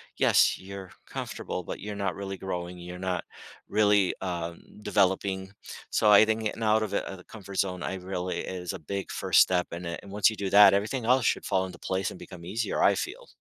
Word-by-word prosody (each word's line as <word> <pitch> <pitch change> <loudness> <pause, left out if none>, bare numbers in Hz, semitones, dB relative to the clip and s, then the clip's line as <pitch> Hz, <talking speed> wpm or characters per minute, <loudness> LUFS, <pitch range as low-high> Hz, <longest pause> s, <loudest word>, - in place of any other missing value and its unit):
yes, - - +4
you're 95 -1 -9
comfortable, - - -5
but - - -6
you're 105 0 -5
not 100 -4 -2
really 95 -1 -5
growing, 90 -1 -5
you're 90 +1 -8
not 90 -1 -2 0.4
really, 105 -3 +3
um, 85 -2 -4 0.2
developing, 95 -1 +1 0.4
so 105 - +3
I 105 - +9
think 110 0 0
getting 110 +1 -3
out 110 0 +3
of 105 -2 -4
it- - - 0
the 90 - -15
comfort 100 -3 -10
zone- 90 -2 0
I 95 - -3
really 90 -1 -4
is 90 -2 -4
a - - -6
big 100 +5 -5
first - - +4
step; 90 -1 +2
and 85 +1 -6
it 85 0 -4
and 100 - -12
once 105 -1 +4
you 110 - -6
do 100 -1 -2
that, 100 -1 +8
everything 110 +6 0
else 125 0 +3
should - - +1
fall 95 0 +1
into 90 -2 -9
place 95 0 -1
and - - -10
become 85 -2 -11
easier, 105 +4 -2
I - - +5
feel. - - -5
95 Hz, 215 wpm, -28 LUFS, 90-105 Hz, 0.4 s, I